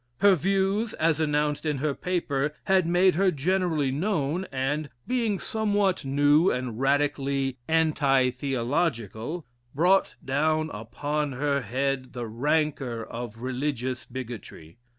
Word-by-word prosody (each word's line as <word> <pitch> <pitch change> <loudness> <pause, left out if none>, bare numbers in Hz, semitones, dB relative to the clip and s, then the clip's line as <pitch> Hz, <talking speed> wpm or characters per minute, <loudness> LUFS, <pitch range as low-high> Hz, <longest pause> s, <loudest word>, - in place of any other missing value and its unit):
Her 200 -1 +7
views, 195 +5 +1
as 160 -1 +1
announced 150 -1 0
in 150 -3 0
her 145 +2 0
paper, 150 -4 -1
had 190 -4 +3
made 180 +2 +4
her 190 +3 +3
generally 160 -2 0
known, 165 +1 -1
and, 140 +3 -1 0.2
being 235 -5 0
somewhat 205 -3 0
new 145 +5 +4
and 125 -3 -3
radically 135 -1 0
"anti 145 -5 +3
theological," 130 - -2 0.3
brought 180 +6 +3
down 155 +3 +1
upon 145 +7 -3
her 140 +1 0
head 130 +3 -2
the 120 -1 -4
rancor 135 0 -1
of 115 0 -7
religious 130 -1 -2
bigotry. 115 -7 -8
145 Hz, 120 wpm, -26 LUFS, 130-170 Hz, 0.3 s, Her